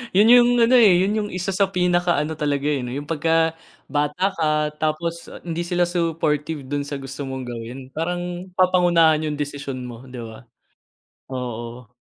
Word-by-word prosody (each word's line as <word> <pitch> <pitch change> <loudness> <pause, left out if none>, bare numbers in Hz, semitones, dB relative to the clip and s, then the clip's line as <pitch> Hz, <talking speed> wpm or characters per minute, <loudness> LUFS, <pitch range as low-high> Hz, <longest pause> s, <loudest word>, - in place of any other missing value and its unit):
yun 210 +3 +6
yung 245 0 +7
ano, 235 +2 +5
eh, 215 -6 +7
yun 205 +3 +1
yung 210 -1 -2
isa 185 +1 -3
sa 195 +1 +2
pinaka 175 -1 +2
ano 155 +1 -4
talaga, 145 -1 -1
eh, 135 -4 -1
'no, 120 - -5
yung 145 +3 -6
pagka 165 +1 +1 0.3
bata 150 +6 0
ka 160 - +1 0.3
tapos 165 +2 -2 0.2
hindi 170 0 -4
sila 175 0 +1
supportive 160 -3 -1
dun 145 +2 -3
sa 140 -1 -5
gusto 135 +1 -6
mong 130 -1 -5
gawin, 120 +2 -7
parang 175 +3 -4
papangunahan 175 -4 +4
yung 150 - -2
desisyon 140 -3 -5
mo 120 0 -9
'di 125 -2 -8
ba, 115 +1 -10 0.9
oo. 120 -1 -6
160 Hz, 170 wpm, -22 LUFS, 135-175 Hz, 0.9 s, yung